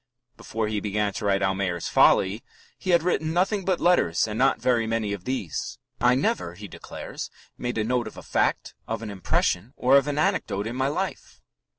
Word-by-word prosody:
Before 110 Hz, -1 st, -3 dB
he 105 Hz, -1 st, -1 dB
began 105 Hz, 0 st, -1 dB
to 110 Hz, -, -4 dB
write 100 Hz, -1 st, +2 dB
Almayer's 95 Hz, -2 st, -1 dB
Folly 100 Hz, +4 st, +4 dB, 0.3 s
he 185 Hz, -, -7 dB
"had 170 Hz, -2 st, +4 dB
written 160 Hz, -3 st, 0 dB
nothing 195 Hz, +3 st, +1 dB
but 185 Hz, -1 st, +1 dB
letters 165 Hz, -, +3 dB
and 105 Hz, -, -4 dB
not 135 Hz, +4 st, +3 dB
very 120 Hz, -3 st, +2 dB
many 110 Hz, -2 st, -1 dB
of 95 Hz, -3 st, -7 dB
these." 115 Hz, -, -3 dB, 0.2 s
"I 125 Hz, +1 st, +4 dB
never," 90 Hz, -, -1 dB
he 105 Hz, +3 st, -9 dB
declares, -, -, -8 dB, 0.3 s
"made 120 Hz, -1 st, -3 dB
a 110 Hz, -, +1 dB
note 120 Hz, +1 st, 0 dB
of -, -, -10 dB
a -, -, -9 dB
fact, -, -, 0 dB
of 115 Hz, 0 st, -3 dB
an 105 Hz, -, -5 dB
impression, 100 Hz, +3 st, 0 dB
or 130 Hz, +2 st, +5 dB
of 140 Hz, +1 st, +2 dB
an 145 Hz, 0 st, -2 dB
anecdote 105 Hz, -9 st, 0 dB
in 115 Hz, +2 st, -4 dB
my 130 Hz, +1 st, +1 dB
life. 185 Hz, +7 st, -4 dB
115 Hz, 200 wpm, -25 LUFS, 100-140 Hz, 0.3 s, or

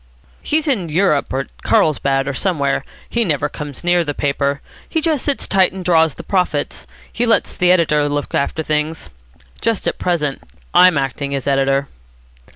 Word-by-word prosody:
"He's 310 Hz, +1 st, 0 dB
in 200 Hz, -, 0 dB
Europe. 155 Hz, -3 st, +1 dB
At 135 Hz, +1 st, -5 dB
Carlsbad, 135 Hz, -3 st, +2 dB
or 140 Hz, -, -1 dB
somewhere. 140 Hz, -3 st, 0 dB, 0.2 s
He 235 Hz, -, 0 dB
never 150 Hz, -6 st, 0 dB
comes 145 Hz, 0 st, -7 dB
near 175 Hz, 0 st, +3 dB
the 145 Hz, -3 st, -4 dB
paper. 140 Hz, 0 st, 0 dB, 0.3 s
He 325 Hz, -, 0 dB
just 310 Hz, -4 st, 0 dB
sits 285 Hz, -2 st, -1 dB
tight 190 Hz, -2 st, +3 dB
and 190 Hz, -2 st, -7 dB
draws 160 Hz, -4 st, +3 dB
the -, -, -9 dB
profits. 180 Hz, -7 st, -1 dB, 0.3 s
He 240 Hz, +1 st, 0 dB
lets 225 Hz, -, +1 dB
the 180 Hz, 0 st, +3 dB
editor 150 Hz, -5 st, +3 dB
look 145 Hz, 0 st, -3 dB
after 160 Hz, +3 st, -1 dB
things. 150 Hz, -, -2 dB, 0.5 s
Just 230 Hz, -2 st, -1 dB
at -, -, -2 dB
present 150 Hz, -6 st, -1 dB, 0.3 s
I'm 180 Hz, -2 st, +6 dB
acting 140 Hz, +1 st, -2 dB
as 135 Hz, -, -4 dB
editor." 135 Hz, 0 st, +1 dB
155 Hz, 165 wpm, -18 LUFS, 140-185 Hz, 0.5 s, I'm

